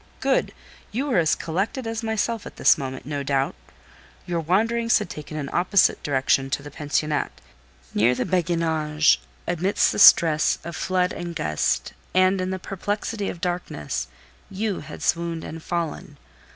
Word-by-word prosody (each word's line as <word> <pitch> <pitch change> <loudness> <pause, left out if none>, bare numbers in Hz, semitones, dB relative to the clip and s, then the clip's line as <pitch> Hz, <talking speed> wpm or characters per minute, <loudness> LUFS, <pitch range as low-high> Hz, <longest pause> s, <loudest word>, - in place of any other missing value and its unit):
"Good! - - +1 0.4
you 255 +6 -1
were 250 -10 +2
as 160 -3 +3
collected 195 +10 -2
as 225 0 -3
myself 225 0 -2
at - - -11
this - - +5
moment, 130 -3 -6
no 145 0 -3
doubt. 135 -1 0 0.7
Your 175 -1 -1
wanderings 225 +8 +2
had - - -4
taken 150 +1 -7
an 145 -2 -3
opposite 185 +2 +3
direction 135 -1 +1
to 140 +1 -2
the 145 - -9
pensionnat. 150 +1 -1 0.6
Near 115 +4 +3
the - - -1
Béguinage, 160 -4 +2 0.3
amidst 180 +3 +2
the - - -3
stress 160 -5 +6
of 170 0 -6
flood 185 -1 0
and 175 -1 -6
gust, 75 - -1 0.2
and 185 0 +4
in 185 - -2
the 190 - -2
perplexity 205 +3 -3
of 170 - -7
darkness, 175 - -3 0.4
you 200 0 -2
had 155 0 -9
swooned 170 -1 0
and 165 +1 -7
fallen. 165 -3 -4
170 Hz, 155 wpm, -24 LUFS, 150-195 Hz, 0.7 s, stress